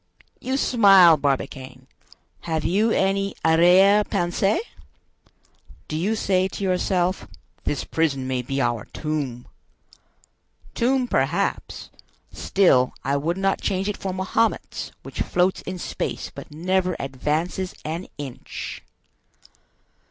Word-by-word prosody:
You 260 Hz, +1 st, -2 dB
smile, 195 Hz, -, +6 dB
Barbicane. 135 Hz, -2 st, -3 dB, 0.5 s
Have 160 Hz, -2 st, -3 dB
you 205 Hz, +7 st, +2 dB
any 195 Hz, -1 st, +1 dB
arriere 180 Hz, +5 st, +6 dB
pensee? 195 Hz, -, 0 dB, 1.3 s
Do 155 Hz, -, -4 dB
you 195 Hz, +8 st, 0 dB
say 190 Hz, -3 st, +1 dB
to 200 Hz, -, -7 dB
yourself, 185 Hz, 0 st, 0 dB, 0.4 s
'This 145 Hz, -, -1 dB
prison 140 Hz, -5 st, -1 dB
may 130 Hz, -1 st, -1 dB
be 135 Hz, +3 st, -3 dB
our 120 Hz, -4 st, 0 dB
tomb?' 140 Hz, -6 st, -4 dB, 1.3 s
Tomb, 255 Hz, +1 st, +1 dB
perhaps; 170 Hz, -, -1 dB, 0.4 s
still 135 Hz, -10 st, +3 dB
I 140 Hz, +1 st, 0 dB
would 160 Hz, +5 st, -1 dB
not 195 Hz, 0 st, 0 dB
change 190 Hz, +1 st, -1 dB
it 210 Hz, -, -1 dB
for 190 Hz, -, -4 dB
Mahomet's, 190 Hz, +5 st, -1 dB
which -, -, -6 dB
floats 180 Hz, +1 st, +1 dB
in 185 Hz, -, -4 dB
space -, -, -4 dB
but -, -, -10 dB
never 180 Hz, +3 st, 0 dB
advances 155 Hz, +7 st, -2 dB
an 165 Hz, +4 st, -4 dB
inch!" 140 Hz, -4 st, -7 dB
175 Hz, 115 wpm, -23 LUFS, 145-195 Hz, 1.3 s, smile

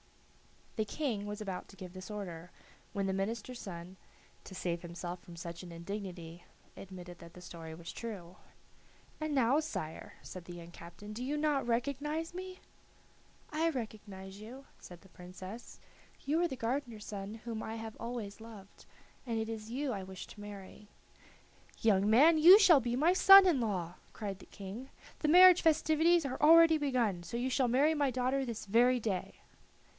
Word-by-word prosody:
The 220 Hz, -, +1 dB
King 220 Hz, -5 st, -3 dB
was 210 Hz, +1 st, -5 dB
about 190 Hz, -3 st, -5 dB
to 195 Hz, -, -15 dB
give 180 Hz, -2 st, -10 dB
this 185 Hz, +1 st, -9 dB
order, 180 Hz, -5 st, -7 dB, 0.4 s
when 200 Hz, -2 st, -2 dB
the 190 Hz, -, -1 dB
minister's 225 Hz, +5 st, -3 dB
son, 180 Hz, 0 st, -8 dB, 0.5 s
to 190 Hz, -, -10 dB
save 170 Hz, -2 st, -2 dB
himself 175 Hz, +1 st, -7 dB
from 175 Hz, -, -12 dB
such 170 Hz, 0 st, -7 dB
an 180 Hz, -2 st, -10 dB
indignity, 175 Hz, -1 st, -7 dB, 0.3 s
admitted 180 Hz, -2 st, -10 dB
that 170 Hz, 0 st, -13 dB
the 180 Hz, -, -12 dB
story 165 Hz, -2 st, -9 dB
was 170 Hz, +1 st, -8 dB
true. 185 Hz, -6 st, -8 dB, 0.8 s
"And 310 Hz, -1 st, -2 dB
now, 265 Hz, +2 st, +3 dB
sire," 160 Hz, -, -5 dB
said 185 Hz, -2 st, -9 dB
the 175 Hz, -, -9 dB
young 170 Hz, 0 st, -10 dB
captain, 175 Hz, +5 st, -11 dB
"do 235 Hz, +3 st, -5 dB
you 290 Hz, +3 st, -2 dB
not 295 Hz, -4 st, 0 dB
recognize 285 Hz, +7 st, -2 dB
me?" 370 Hz, +1 st, -8 dB, 0.9 s
"I 320 Hz, +2 st, +1 dB
recognize 205 Hz, -7 st, -7 dB
you," 255 Hz, +5 st, -10 dB
said 175 Hz, -1 st, -12 dB
the 195 Hz, -, -19 dB
Princess; 185 Hz, +6 st, -10 dB, 0.5 s
"you 310 Hz, +4 st, +1 dB
are 350 Hz, -, +3 dB
the 265 Hz, -, -5 dB
gardener's 235 Hz, -2 st, -3 dB
son 205 Hz, +1 st, -6 dB
whom 225 Hz, -1 st, -5 dB
I 220 Hz, -, -5 dB
have 225 Hz, -1 st, -7 dB
always 230 Hz, -3 st, -6 dB
loved, 215 Hz, -4 st, -13 dB, 0.4 s
and 230 Hz, -1 st, -1 dB
it 220 Hz, 0 st, -2 dB
is 220 Hz, -1 st, -6 dB
you 265 Hz, +3 st, -2 dB
I 200 Hz, -, -3 dB
wish 190 Hz, 0 st, -8 dB
to 210 Hz, -, -12 dB
marry." 205 Hz, 0 st, -10 dB, 0.9 s
"Young 205 Hz, -2 st, +3 dB
man, 305 Hz, +9 st, +6 dB
you 355 Hz, +6 st, +10 dB
shall 360 Hz, -8 st, +7 dB
be 240 Hz, -1 st, -2 dB
my 315 Hz, +7 st, +3 dB
son 390 Hz, +1 st, +9 dB
in 340 Hz, -8 st, +3 dB
law," 180 Hz, -6 st, -2 dB, 0.2 s
cried 200 Hz, -3 st, -5 dB
the -, -, -15 dB
King. 210 Hz, +7 st, -9 dB, 0.3 s
"The 305 Hz, -, -1 dB
marriage 360 Hz, +2 st, +8 dB
festivities 320 Hz, +1 st, +3 dB
are 260 Hz, +1 st, -4 dB
already 325 Hz, +1 st, +7 dB
begun, 245 Hz, -10 st, 0 dB
so 175 Hz, +7 st, -5 dB
you 255 Hz, +2 st, -1 dB
shall 255 Hz, -1 st, +2 dB
marry 275 Hz, +6 st, +3 dB
my 290 Hz, -3 st, +1 dB
daughter 255 Hz, +2 st, 0 dB
this 235 Hz, -4 st, -5 dB
very 245 Hz, +5 st, +4 dB
day." 205 Hz, -5 st, -3 dB
220 Hz, 175 wpm, -33 LUFS, 190-275 Hz, 0.9 s, you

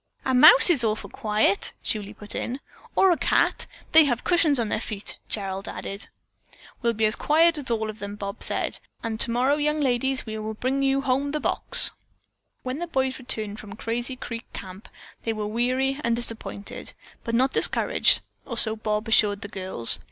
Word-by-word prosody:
"A 260 Hz, -, 0 dB
mouse 375 Hz, -, +9 dB
is 280 Hz, -8 st, +4 dB
awful 215 Hz, -1 st, -2 dB
quiet," 210 Hz, -4 st, 0 dB
Julie 210 Hz, -1 st, -3 dB
put 210 Hz, 0 st, -8 dB
in. 255 Hz, +3 st, -4 dB, 0.4 s
"Or 385 Hz, -, +4 dB
a 340 Hz, -, +1 dB
cat. -, -, +1 dB, 0.2 s
They 320 Hz, -1 st, +7 dB
have 245 Hz, -4 st, -1 dB
cushions 325 Hz, -6 st, +2 dB
on 225 Hz, -2 st, -1 dB
their 215 Hz, -, -2 dB
feet," 210 Hz, -4 st, -6 dB
Gerald 195 Hz, -2 st, -4 dB
added. 200 Hz, +1 st, -7 dB, 0.7 s
"We'll 235 Hz, -1 st, +1 dB
be 220 Hz, +1 st, +2 dB
as 215 Hz, -, +2 dB
quiet 320 Hz, +1 st, +2 dB
as 270 Hz, -, -2 dB
all 220 Hz, -2 st, -1 dB
of 215 Hz, 0 st, -8 dB
them," 200 Hz, 0 st, -7 dB
Bob 200 Hz, +1 st, -7 dB
said, -, -, +2 dB, 0.2 s
"and 220 Hz, -1 st, -4 dB
tomorrow, 250 Hz, +5 st, +2 dB
young 300 Hz, +1 st, 0 dB
ladies, 265 Hz, -1 st, -1 dB
we 220 Hz, -, -7 dB
are 215 Hz, -, -5 dB
going 215 Hz, 0 st, -5 dB
to -, -, -33 dB
bring 270 Hz, +1 st, 0 dB
home 275 Hz, +1 st, 0 dB
the 305 Hz, -, -1 dB
box." -, -, +3 dB, 0.7 s
When 255 Hz, +3 st, -4 dB
the 345 Hz, -, -4 dB
boys 265 Hz, -4 st, -2 dB
returned 215 Hz, -4 st, -3 dB
from 200 Hz, -2 st, -10 dB
Crazy 240 Hz, +3 st, -4 dB
Creek 230 Hz, -2 st, -8 dB
Camp 190 Hz, +2 st, -10 dB, 0.3 s
they 225 Hz, -, -2 dB
were 215 Hz, -1 st, -4 dB
weary 255 Hz, +5 st, -1 dB
and 235 Hz, 0 st, +1 dB
disappointed, 230 Hz, -3 st, -3 dB, 0.3 s
but 230 Hz, -1 st, -3 dB
not 260 Hz, +3 st, +2 dB
discouraged, -, -, +4 dB, 0.2 s
or -, -, -6 dB
so 220 Hz, -1 st, +4 dB
Bob 215 Hz, +1 st, -3 dB
assured 205 Hz, -2 st, +2 dB
the 205 Hz, -, -7 dB
girls. 185 Hz, -, +1 dB
235 Hz, 190 wpm, -24 LUFS, 215-270 Hz, 0.7 s, mouse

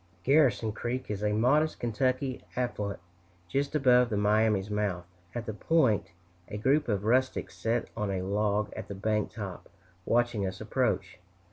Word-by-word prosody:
Garrison 130 Hz, -5 st, +3 dB
Creek 120 Hz, +3 st, -4 dB
is 105 Hz, -1 st, -3 dB
a 105 Hz, -, +2 dB
modest 135 Hz, +9 st, +2 dB
Kentucky 130 Hz, +3 st, -1 dB
affluent, 105 Hz, -5 st, -2 dB, 0.5 s
just 140 Hz, -, -1 dB
above 125 Hz, -4 st, +5 dB
the 105 Hz, -, -1 dB
Miami's 105 Hz, -1 st, +2 dB
mouth. 100 Hz, -4 st, -1 dB, 0.3 s
At 120 Hz, -1 st, -3 dB
the 110 Hz, -, -4 dB
point, 130 Hz, -2 st, +2 dB, 0.4 s
a 105 Hz, -, -5 dB
group 135 Hz, +7 st, +2 dB
of 100 Hz, -3 st, 0 dB
rustics 130 Hz, +3 st, +1 dB
sat 115 Hz, +1 st, -1 dB
on 105 Hz, -3 st, -2 dB
a 95 Hz, -1 st, -2 dB
log 105 Hz, +1 st, 0 dB
at -, -, -7 dB
the 100 Hz, -, -6 dB
bank 105 Hz, +1 st, -1 dB
top, 100 Hz, -4 st, -7 dB, 0.4 s
watching 120 Hz, -3 st, +1 dB
us 95 Hz, 0 st, -6 dB
approach. -, -, -1 dB
110 Hz, 155 wpm, -29 LUFS, 105-125 Hz, 0.5 s, above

